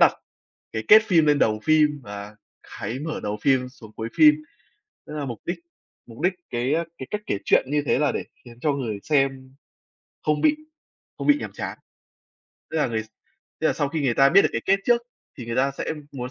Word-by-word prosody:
đặt - - +7 0.6
cái 110 - -3
kết 220 - +9
phim 170 -7 +3
lên 145 -1 +3
đầu 110 -1 +2
phim, 150 -2 +3
và 100 +1 -8 0.4
cái 125 +3 -4
mở 155 +2 -4
đầu 105 +1 -2
phim 130 -2 +2
xuống 115 -5 -15
cuối 115 +1 -4
phim, 300 -1 +8 0.7
tức - - -9
là 150 -1 -3
mục 120 -5 -6
đích 175 0 -3 0.5
mục 115 +1 -13
đích 180 +2 +3 0.2
cái 125 +4 0 0.2
cái 130 - -6
cách 210 - -2
kể 100 - -1
chuyện - - +4
như 150 0 +1
thế - - +2
là 145 0 +2
để - - -3 0.2
khiến 120 -1 -14
cho 150 +2 +1
người 120 -7 -3
xem 135 -3 0 0.7
không 150 -1 +1
bị 305 - +4 0.6
không - - -4
bị 290 0 +6
nhàm - - -6
chán. - - -5 0.9
Tức 160 - -3
là 150 - +2
ng 120 - -6 0.7
tức - - +2
là - - +3
sau 145 - -1
khi 160 +2 -3
người 130 -5 +1
ta 135 +2 +6
biết 195 +6 +6
được - - +3
cái - - -1
kết 195 +1 +3
trước 240 -1 +4 0.4
thì 120 - -7
người 115 +1 -3
ta 135 +2 +3
sẽ - - -2 0.2
muốn 125 -2 -5
140 Hz, 215 wpm, -24 LUFS, 120-155 Hz, 0.9 s, kết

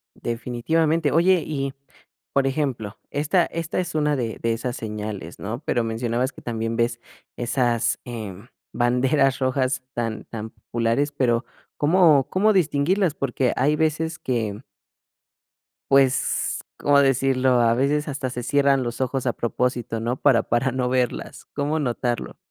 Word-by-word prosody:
Definitivamente. 145 +7 0
Oye, 175 +1 +4
y, 140 -3 -3 0.6
por 135 -1 +3
ejemplo, 130 -7 -2
esta 160 +5 +2
esta 165 +1 -3
es 175 -3 -3
una 150 -1 +2
de 115 -4 -3
de 115 0 +1
esas 120 +2 -3
señales, 105 -5 -6
¿no?, 110 +5 -4
pero 120 - +1
mencionabas 120 +3 -1
que - - -13
también 115 -1 -3
ves 120 0 0 0.4
esas, 120 -1 +1
em, 110 -3 -7 0.3
banderas 130 +3 +2
rojas, 130 0 0
tan 115 -2 -3
tan 110 -1 -6
populares, 120 +5 -1
pero, 125 -4 +1 0.3
¿cómo 155 -3 +4
cómo 210 +3 +3
distinguirlas? 175 +1 +2
Porque 130 -2 0
hay 145 +4 +3
veces 160 +1 0
que 115 -2 -2 1.3
pues, 135 -1 +2 0.2
¿cómo 145 0 +4
decirlo? 130 -2 +3
A 115 0 +4
veces 145 +4 +1
hasta 135 -3 -3
se 125 - -4
cierran 140 +1 +3
los 120 +1 -4
ojos 130 0 -1
a 120 - +2
propósito, 120 -1 -1
¿no? 120 +3 -1
Para 130 -6 +4
para 125 +4 0
no 125 -1 -1
verlas, 125 -2 -2
¿cómo 145 +2 -1
notarlo? 120 -3 -2
130 Hz, 140 wpm, -23 LUFS, 120-145 Hz, 1.3 s, Oye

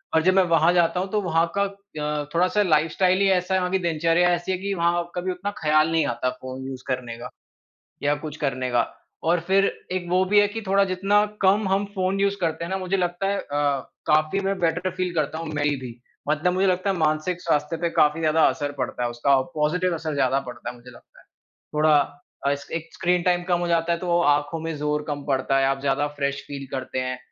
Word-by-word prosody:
और 160 - +5
जब 185 - +4
मैं 190 0 +5
वहाँ 165 +1 +5
जाता 175 0 +2
हूँ 190 +1 -2
तो 210 -1 +1
वहाँ 165 -2 +2
का 200 - +3
अ, 155 -7 -4
थोड़ा-सा 180 +5 +2
लाइफस्टाइल 180 +2 +2
ही 195 - +4
ऐसा 185 0 +1
है, 190 - +3
वहाँ 180 0 -1
की 190 - +2
दिनचर्या 170 +1 +2
ऐसी 175 +2 -4
है 185 - 0
कि 200 +1 -3
वहाँ 170 -1 0
कभी 180 +1 -2
उतना 190 +3 -4
ख्याल 155 +1 +3
नहीं 165 -2 +2
आता 120 +1 -1
फ़ोन 130 0 -7
यूज़ 130 -1 -7
करने 120 -2 -3
का 120 - -7 0.7
या 145 0 +2
कुछ 155 -1 -5
करने 130 -4 -2
का। 120 -1 +3 0.4
और 170 +1 +2
फिर 195 +1 +4 0.3
एक 180 -1 -2
वो 185 +1 +3
भी 205 +2 +4
है 205 - +4
कि 225 +2 -6
थोड़ा 195 +1 +4
जितना 200 +3 +3 0.2
कम 195 +1 +3
हम 195 +1 +1
फ़ोन 190 0 0
यूज़ 200 0 +2
करते 165 -1 -1
हैं 170 - -6
ना 190 - 0
मुझे 190 +1 -1
लगता 175 +1 -1
है 200 0 0
अ, 145 -4 -1 0.2
काफ़ी 155 +6 +2
मैं 195 0 0
बेटर 175 +2 0
फील 180 -1 -2
करता 155 0 -1
हूँ 165 -1 -5
मेबी 145 -5 -1 0.3
मतलब 155 +4 +1
मुझे 190 +2 +2
लगता 185 +1 +1
है 190 - -1
मानसिक 160 +3 0
स्वास्थ्य 150 -1 0
पे 170 - +1
काफ़ी 150 +2 +3
ज़्यादा 155 0 +2
असर 145 -2 -3
पड़ता 125 - -3
है 120 - -1
उसका 135 +3 +2
पॉज़िटिव 175 +4 +1
असर 160 -2 -3
ज़्यादा 135 -1 +2
पड़ता 125 - -7
है - - -10
मुझे 125 +1 -14
लगता 120 - -18
है। - - -23 0.5
थोड़ा 150 0 +4 0.5
अ, - - +3
एस 140 0 -3
एक 165 -1 -4
स्क्रीन 180 0 +1
टाइम 175 0 +2
कम 175 - +3
हो 175 - -1
जाता 170 0 +1
है 170 - 0
तो 175 -1 +1
आँखों 145 +1 +1
में 165 0 -4
ज़ोर 150 0 -1
कम 145 -1 -4
पड़ता 135 0 +1
है 135 - +3
आप 135 0 0
ज़्यादा 140 +1 +1
फ्रेश 140 0 -1
फील 140 -1 -7
करते 130 0 -4
हैं, 130 0 -3
165 Hz, 235 wpm, -24 LUFS, 145-185 Hz, 0.7 s, और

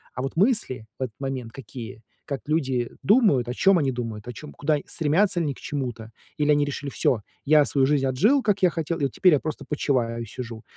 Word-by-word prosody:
А 125 - -3
вот 135 +4 -4
мысли 195 - +1
в - - -1
этот 115 -4 -5
момент 135 -4 -4
какие? 115 -3 -9 0.2
Как 140 -4 -4
люди 135 -6 0
думают, 195 - +4
о 125 - -3
чём 195 +3 +4
они 140 -4 +1
думают, 115 -3 -5
о 125 - -5
чём, 150 +6 -10
куда 150 +1 +1
стремятся 175 +5 +1
ли 165 - 0
они 145 - -1
к - - -15
чему-то, 120 -6 -5 0.3
или 150 0 +2
они 145 0 +4
решили: 145 0 -4
"Всё, 115 -5 +1 0.2
я 150 0 +5
свою 135 -2 +2
жизнь 140 -2 +2
отжил, 210 - +3
как 205 -2 +1
я 185 - +5
хотел, 165 0 -3
и - - -2
вот 135 - +1
теперь 180 +3 +4
я 145 - +4
просто 155 +1 -5
почиваю 120 -6 0
и - - -5
сижу". 115 0 -7
140 Hz, 230 wpm, -25 LUFS, 125-155 Hz, 0.3 s, я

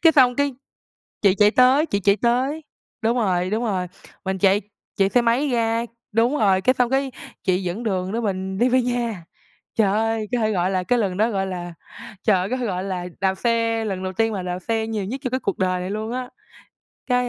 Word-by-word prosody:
cái 325 -1 +7
xong 255 -4 +5
cái 285 -1 +1 0.7
chị 195 -2 +4
chạy 210 0 +5
tới, 255 +5 +5
chị 200 -10 -1
chạy 200 +1 +3
tới 260 +6 +1 0.4
đúng 230 +2 +1
rồi, 185 -5 +1
đúng 220 +4 -1
rồi, 190 -5 -1 0.4
mình 190 0 -1
chạy 195 +2 +3 0.4
chạy 195 -1 +3
xe 245 - +3
máy 240 +5 +2
ra 230 -1 +1 0.3
đúng 235 +6 +2
rồi, 195 -5 +3
cái 255 +7 +3
xong, 250 -2 +1
cái 270 +1 0 0.3
chị 185 -2 +1
dẫn 180 +6 -3
đường 190 -4 -1
đó 230 - -1
mình 190 -2 -2
đi 245 +5 +3
về 255 +1 +4
nhà. 235 -7 -2 0.5
Trời 210 -4 +3
ơi, 220 0 0
có 245 - +1
thể 220 -1 +1
gọi 185 -2 0
là 185 -1 0
cái 245 +6 +1
lần 190 -4 -1
đó, 220 +3 +3
gọi 195 -2 -1
là, 175 -2 -5 0.5
trời 210 -4 +4
ơi 185 +2 -2
có 255 - -1
thể 250 - -2
gọi 185 -4 -2
là 185 -2 -3
đạp 190 -1 +2
xe, 230 +1 0
lần 190 -3 -3
đầu 185 0 -3
tiên 225 +3 +1
mà 190 -3 -3
đạp 180 0 -3
xe 220 +3 -1
nhiều 215 -3 -2
nhất 255 +7 -5
trong 255 - -2
cái 260 - 0
cuộc 200 - -2
đời 185 -1 0
này 180 - -4
luôn 215 +2 -3
á. 250 0 -4 0.8
Cái, 250 -1 +1
220 Hz, 235 wpm, -22 LUFS, 190-245 Hz, 0.8 s, cái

